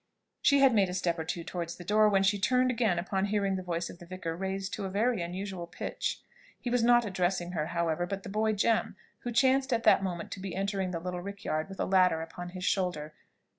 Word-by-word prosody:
She 280 -1 +5
had 270 -3 +6
made 200 -4 +3
a 180 - -4
step 175 -2 0
or - - -1
two 170 +1 -4
towards 170 -1 -4
the 175 - -10
door, 210 +3 +4
when 195 -1 +3
she 200 +1 +2
turned 255 +4 +3
again 225 -7 +1
upon 190 +2 -1
hearing 200 -1 0
the 185 - -3
voice 175 -1 -2
of 175 - -11
the 175 - -12
vicar 175 -2 -4
raised 190 +1 -3
to 200 - -3
a - - -3
very 220 +2 +1
unusual 180 0 -5
pitch. 170 - -4 0.4
He 245 - -4
was 245 -1 +2
not 240 0 +5
addressing 180 -2 -1
her, 155 -4 -2
however, 170 0 -1
but 195 +1 -4
the - - -8
boy 215 +2 +1
Jem, 225 +2 +1 0.2
who 245 - -4
chanced 265 +3 +3
at 230 -1 +1
that - - +6
moment 180 -3 -4
to - - -5
be 190 0 -5
entering 195 -1 -1
the 170 -2 -3
little 180 +1 -4
rickyard 195 -4 -3
with 195 - -9
a - - +1
ladder 185 -4 +3
upon 175 +2 -8
his 180 +1 -6
shoulder. 175 -7 -1
190 Hz, 240 wpm, -30 LUFS, 175-210 Hz, 0.4 s, had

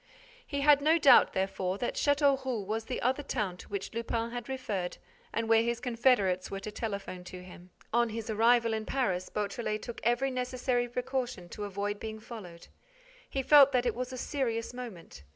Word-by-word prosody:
He 280 -2 -2
had 290 0 +6
no 315 +3 +4
doubt, 280 -6 +6
therefore, 190 0 -1
that 240 - -2
Châteauroux 270 -6 +1
was 220 +2 -3
the 250 - -3
other 260 +4 +1
town 215 -10 -2
to - - -12
which 200 0 -4
Lupin 230 0 -2
had 245 +1 -6
referred 205 -9 -3 0.3
and 230 +1 -2
where 225 0 +5
his 235 0 -1
confederates 230 -7 +2
were 195 - -4
to 210 +2 -6
telephone 200 -4 -5
to 180 0 -9
him. 180 0 -13 0.2
On 235 0 +3
his 225 0 -5
arrival 230 +1 +3
in 220 -1 -3
Paris, 190 -9 -1
Beautrelet 210 +1 -3
took 235 - -7
every 240 +4 +2
necessary 250 -1 -1
precaution 245 -6 -3
to 210 - -5
avoid 205 +1 -3
being 220 0 -6
followed. 200 -7 -10 0.6
He 270 - -2
felt 280 -1 +7
that 250 -1 +2
it 240 - +1
was 250 +1 -4
a 255 - -6
serious 245 -4 -2
moment. 225 - -9
230 Hz, 185 wpm, -30 LUFS, 205-255 Hz, 0.6 s, felt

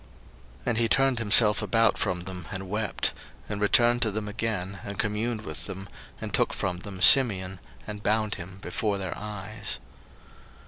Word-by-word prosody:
01:042:024 - - -24 0.6
And 120 -2 0
he 115 - +2
turned 135 -1 +3
himself 105 -1 +5
about 115 -2 +3
from 90 -1 -1
them, 90 0 -7
and 95 -1 -5
wept; 105 +2 -1 0.3
and 105 0 -4
returned 120 +3 +4
to 115 - +2
them 105 0 -3
again, 105 -3 -3
and 100 -1 -6
communed 110 +2 -1
with - - -5
them, 95 0 -7 0.3
and - - -6
took - - +3
from 90 -2 -2
them 95 0 -6
Simeon, 95 -8 +6 0.3
and 105 -1 -6
bound 110 0 +1
him 95 0 -8
before 100 +3 -2
their 95 -2 -4
eyes. 105 0 -6
105 Hz, 170 wpm, -27 LUFS, 95-110 Hz, 0.6 s, Simeon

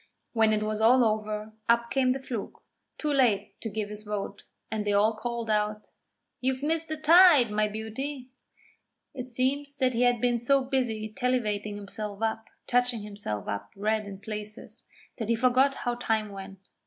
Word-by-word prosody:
When 220 -2 +4
it 215 0 +1
was 215 0 -2
all 245 +2 +6
over, 215 0 -2 0.2
up 235 0 +3
came 260 -1 +3
the 265 - -1
Fluke, 245 -5 -6 0.3
too 300 -1 -1
late 245 -8 +1
to 225 - -3
give 210 0 -3
his 210 0 -7
vote, 210 -1 -5 0.3
and 220 -1 -1
they 205 0 0
all 215 +2 +3
called 235 +1 -4
out: 210 0 -1 0.5
'You've 260 +1 -1
missed 325 +2 0
the 315 - -3
tide, 310 - +7
my 210 0 +2
beauty!' 250 +5 -5 0.8
It 255 -2 -6
seems 280 +3 -1
that 255 -2 +2
he 235 - 0
had 245 -1 +3
been 240 0 +1
so 270 +3 +3
busy 245 -5 -1
tallivating 215 -5 -1
himself 205 +1 -4
up, 225 0 -1 0.2
touching 245 -3 +1
himself 200 - -5
up 100 0 -4
red 215 +1 0
in 195 -1 -7
places, 210 +1 -8 0.3
that 225 -1 -3
he 230 - +4
forgot 255 +4 +3
how 245 - +1
time 225 -3 -1
went. 195 0 -9
225 Hz, 175 wpm, -28 LUFS, 210-255 Hz, 0.8 s, tide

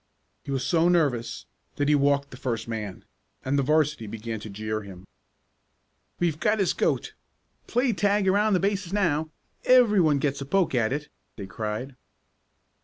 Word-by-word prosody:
He - - -11
was 135 -2 -1
so 170 0 +3
nervous 135 -10 0 0.3
that 145 - 0
he 150 - +4
walked 140 0 +2
the - - -9
first 115 -3 -3
man, 105 -4 -5 0.4
and 135 +2 0
the 140 - +3
'varsity 150 -4 +1
began 110 +1 -5
to 110 - -8
jeer 110 +1 -4
him. 95 -2 -11 1.1
"We've 165 -3 0
got 215 0 +2
his 195 -4 +1
goat! - - -1 0.5
Play 245 0 +1
tag 200 +1 +1
around 205 +2 +3
the 185 - +3
bases 195 -1 -1
now! 160 -6 +1 0.3
Everyone 210 - +5
gets 140 0 -1
a - - -4
poke 190 0 +1
at 115 -3 +1
it!" 150 +2 -3 0.3
they 100 - -7
cried. 110 +6 -5
145 Hz, 165 wpm, -26 LUFS, 115-185 Hz, 1.1 s, Everyone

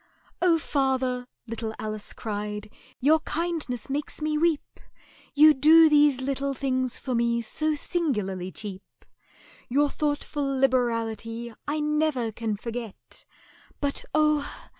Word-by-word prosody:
"Oh, 350 -2 +5
father," 260 -4 0 0.2
little 225 -1 -5
Alice 215 -1 -5
cried, 210 -1 -5 0.3
"your 305 +5 +4
kindness 315 -7 -3
makes 285 +2 -3
me 305 0 -1
weep, 320 -1 0 0.6
You 305 +1 +8
do 315 +3 +7
these 295 -3 +5
little 275 +1 -2
things 260 -2 -1
for 260 - -4
me 235 0 +1
so 310 +7 -1
singularly 210 - -1
cheap— 200 -3 -9 0.6
Your 285 +3 +2
thoughtful 295 0 -2
liberality 235 -3 0
I 300 +1 -1
never 300 -6 0
can 220 -1 -3
forget; 230 -1 -7 0.5
But, 285 -1 -1
oh! 305 -1 +2
265 Hz, 120 wpm, -26 LUFS, 230-300 Hz, 0.6 s, You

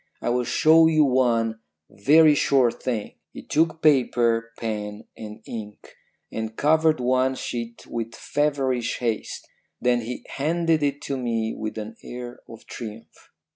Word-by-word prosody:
I - - -2
will 125 0 +1
show 160 +4 +5
you 155 -2 +4
one 115 -4 +1 0.3
very 150 +8 +5
short 135 -4 +2
thing.' 115 -5 -3 0.2
"He - - -9
took 160 +1 0
paper, 120 -5 +3
pen 105 -2 -4
and 105 -1 -10
ink, 105 -2 -9 0.4
and 110 0 -4
covered 160 +1 +3
one 130 +1 +1
sheet 115 -2 -6
with 115 -1 -5
feverish 135 -5 -1
haste. 115 -3 -3 0.3
Then 120 -1 +2
he 120 +2 -6
handed 165 +2 0
it 145 0 -1
to 140 - -3
me 115 -3 -1
with 110 0 -5
an 110 +1 -7
air 120 0 -8
of 115 -1 -12
triumph. 110 -1 -10
125 Hz, 140 wpm, -24 LUFS, 115-145 Hz, 0.4 s, show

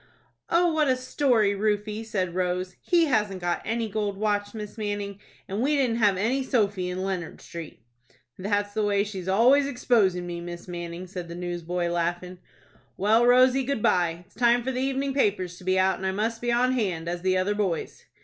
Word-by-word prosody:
"Oh, 340 0 +3
what 310 -2 +2
a 260 - +3
story, 255 -5 +2
Rufie!" 210 +1 -1
said 190 -6 -2
Rose. 180 0 -2
"He 345 -2 +3
hasn't 210 -9 0
got 175 -1 -1
any 230 0 -1
gold 205 -1 -2
watch, 205 0 -1
Miss 210 -1 -7
Manning, 205 -2 -4 0.3
and 200 +3 -3
we 290 +4 +2
didn't 250 -5 +1
have 205 -4 +3
any 235 +8 +1
sofy 205 -8 0
in 185 +1 -3
Leonard 185 -4 -4
Street." 165 -8 -9 0.5
"That's 205 +1 -1
the 215 - 0
way 200 -1 +2
she's 195 -3 -6
always 250 +9 +4
exposin' 220 -9 +1
me, 170 -1 -5
Miss 175 +1 -8
Manning," 175 0 -6
said 180 -1 -7
the 170 - -7
newsboy, 175 0 -3
laughing. 175 +1 -2 0.6
"Well, 220 +4 +4
Rosy, 255 +2 +5
good 255 -4 -2
by. 170 -1 +1
It's - - -29
time 240 +1 +3
for 265 - -1
the 255 0 -2
evenin' 270 +1 -1
papers 190 -9 0
to - - -13
be 185 +1 +1
out, 190 0 +3
and 190 - -5
I - - +1
must 225 +3 -2
be 240 0 0
on 245 +2 +3
hand, 190 -10 -1
as 175 0 -3
the 185 0 +2
other 185 +3 +1
boys." 195 -6 -2
205 Hz, 195 wpm, -26 LUFS, 180-235 Hz, 0.6 s, Rosy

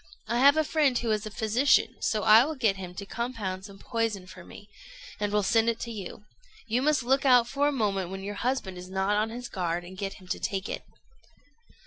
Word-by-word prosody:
I 235 +2 0
have 280 +3 +6
a 315 - +4
friend 295 -4 +2
who 235 -2 -1
is 215 0 -1
a - - -5
physician, 225 +6 +2
so 215 -2 0
I 220 +4 +8
will 310 +3 -3
get 225 -7 +2
him 180 -2 -8
to 200 - -6
compound 200 -5 -4
some 200 -2 -12
poison 225 -4 -2
for 185 - -12
me, 205 - -13 0.5
and 205 -1 -1
will 210 0 +2
send 225 +3 +3
it 230 - -2
to 235 - -4
you. 210 0 -8 0.4
You 230 +2 0
must 295 -2 +2
look 265 +3 +2
out 250 -3 +5
for 280 +3 +1
a - - +2
moment 200 -8 -1
when 195 0 -6
your 205 +1 -4
husband 235 -8 -2
is 180 +1 -10
not 190 +2 0
on 215 +1 +1
his 245 +2 -6
guard, 175 -4 -2
and 180 +2 -11
get 195 +1 -4
him 185 - -15
to - - -2
take 195 +1 -3
it." - - -4
215 Hz, 235 wpm, -28 LUFS, 195-245 Hz, 0.5 s, I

